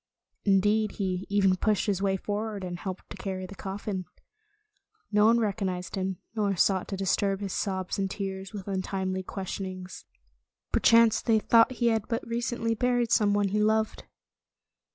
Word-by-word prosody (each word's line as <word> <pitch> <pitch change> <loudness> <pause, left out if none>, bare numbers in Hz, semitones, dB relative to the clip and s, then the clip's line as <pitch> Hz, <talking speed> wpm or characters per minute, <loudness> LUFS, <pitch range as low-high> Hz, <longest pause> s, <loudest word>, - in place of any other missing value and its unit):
Indeed, 210 +2 +3
he 185 -2 -2
even 195 -2 +3
pushed 210 +1 +1
his 195 -3 0
way 195 -1 +1
forward 210 0 -3
and 175 -1 -5
helped 190 -1 -6
to - - -7
carry 190 -1 -4
the 185 - -9
coffin. 195 -1 -5 1.1
No 210 0 +5
one 235 +1 +5
recognized 195 -4 -2
him, 190 -1 -2 0.2
nor 205 -3 0
sought 190 +1 +2
to 195 - -4
disturb 195 +1 +1
his 200 -2 -4
sobs 190 -1 -2
and 195 -1 0
tears 190 -1 -5
with 200 -3 -7
untimely 190 -1 -2
questionings. 185 -1 -6 0.7
Perchance 230 0 +5
they 225 -1 +3
thought 230 +3 +4
he 240 -1 +2
had 220 -2 0
but 230 - -2
recently 235 -1 -1
buried 245 0 +1
some 205 -2 +4
one 205 -1 +2
he 210 +2 +1
loved. 220 +1 +1
200 Hz, 160 wpm, -28 LUFS, 190-220 Hz, 1.1 s, No